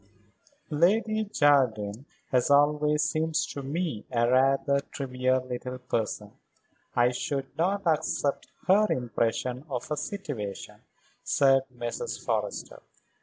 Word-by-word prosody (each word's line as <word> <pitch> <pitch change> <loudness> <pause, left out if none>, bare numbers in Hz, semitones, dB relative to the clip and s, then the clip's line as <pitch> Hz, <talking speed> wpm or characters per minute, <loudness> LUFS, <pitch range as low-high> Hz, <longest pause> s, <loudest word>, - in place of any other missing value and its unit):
"Lady 215 +7 +2
Jardine 130 - +2 0.3
has 125 0 +2
always 150 +1 +4
seemed 160 0 -1
to 150 -2 -1
me 145 -4 -3
a 120 -1 +2
rather 135 +2 +3
trivial 130 -2 -1
little 125 0 -5
person. 110 -4 -3 0.6
I 120 0 +4
should 135 +2 -3
not 190 +6 0
accept 150 -3 0 0.2
her 205 +3 +5
impression 125 +1 -1
of 130 +3 -4
a 150 - 0
situation," 145 - -5 0.5
said 135 -1 +3
Mrs. 120 -1 -5
Forrester. - - -3
135 Hz, 110 wpm, -28 LUFS, 125-150 Hz, 0.6 s, her